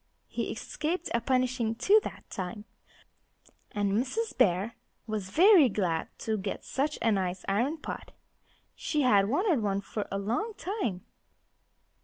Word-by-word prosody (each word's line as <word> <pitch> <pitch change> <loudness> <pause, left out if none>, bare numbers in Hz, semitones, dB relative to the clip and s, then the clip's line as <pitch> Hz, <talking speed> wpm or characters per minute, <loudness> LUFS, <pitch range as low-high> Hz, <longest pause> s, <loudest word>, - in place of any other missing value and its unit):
He - - -3
escaped 330 +3 -3
a 235 - +2
punishing, 255 -2 +1
too, 410 - +5
that - - -8
time. 195 +2 -5 1.1
And 205 -1 0
Mrs. 265 - -1
Bear 205 -1 +2 0.3
was 215 -4 -3
very 345 - +7
glad 180 -6 0
to 220 -1 -1
get 195 0 -4
such 295 +3 -1
a 225 - +4
nice 185 -2 -1
iron 240 +11 +1
pot. 300 - -7 0.6
She 300 -2 -1
had 200 -5 +4
wanted 320 - +2
one 200 -2 0
for 205 +1 -4
a 195 - -1
long 240 - -2
time. 370 - -3
230 Hz, 140 wpm, -29 LUFS, 200-300 Hz, 1.1 s, very